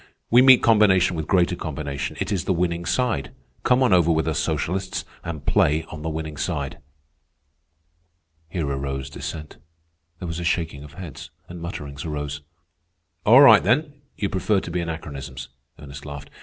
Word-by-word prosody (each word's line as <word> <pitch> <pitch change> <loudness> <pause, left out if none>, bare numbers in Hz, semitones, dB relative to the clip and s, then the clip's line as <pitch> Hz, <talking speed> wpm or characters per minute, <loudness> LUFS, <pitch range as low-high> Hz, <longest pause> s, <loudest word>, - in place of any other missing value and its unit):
We 120 +2 +7
meet 130 -1 +7
combination 95 -5 +4
with 80 -1 -4
greater 90 -1 +2
combination. 70 -4 -5
It 105 - -2
is 95 -4 -1
the 95 - +1
winning 85 0 -1
side. 90 - 0 0.3
Come 125 +1 +3
on 125 - +4
over 85 -2 +4
with 80 0 +1
us 80 -3 0
socialists 95 +2 -2 0.2
and 80 -4 -6
play 80 +2 +2
on 80 - -7
the 80 - -3
winning 80 -1 -5
side." 70 -1 -3 1.7
Here 85 -4 -2
arose 70 0 -3
dissent. 75 +2 -7 0.6
There 90 - -6
was 85 +1 -4
a - - -4
shaking 80 -4 -1
of 75 -1 -13
heads, 85 -6 -9 0.2
and 85 -1 -9
mutterings 75 -5 -6
arose. 75 -2 -4 0.9
"All 125 +6 +9
right, 115 -7 +9
then, 145 - +1 0.2
you 100 - -1
prefer 100 +2 +1
to - - -7
be 90 - -1
anachronisms," 70 -7 -6 0.3
Ernest 70 -1 -10
laughed. 70 -1 -9
80 Hz, 165 wpm, -23 LUFS, 75-95 Hz, 1.7 s, All